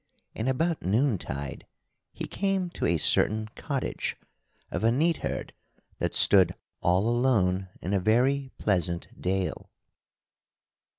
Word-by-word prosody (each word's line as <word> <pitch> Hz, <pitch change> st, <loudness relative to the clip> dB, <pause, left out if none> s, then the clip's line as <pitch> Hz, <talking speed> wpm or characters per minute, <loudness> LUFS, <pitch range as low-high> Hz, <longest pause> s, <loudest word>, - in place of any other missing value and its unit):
And 115 Hz, +4 st, -2 dB
about 160 Hz, +5 st, 0 dB
noontide 95 Hz, -, -1 dB, 0.4 s
he -, -, -5 dB
came 195 Hz, -3 st, -1 dB
to -, -, -2 dB
a 85 Hz, -, +2 dB
certain 110 Hz, +7 st, +3 dB
cottage 140 Hz, -4 st, -3 dB, 0.5 s
of -, -, -3 dB
a 115 Hz, -, +4 dB
neatherd 160 Hz, +6 st, -1 dB, 0.5 s
that -, -, -1 dB
stood 95 Hz, -3 st, +5 dB, 0.3 s
all 90 Hz, +5 st, +2 dB
alone 105 Hz, -7 st, +2 dB
in 95 Hz, -, -2 dB
a 100 Hz, -, +3 dB
very 130 Hz, +7 st, +2 dB
pleasant 90 Hz, -4 st, 0 dB
dale. 95 Hz, 0 st, -2 dB
110 Hz, 115 wpm, -27 LUFS, 90-135 Hz, 0.5 s, stood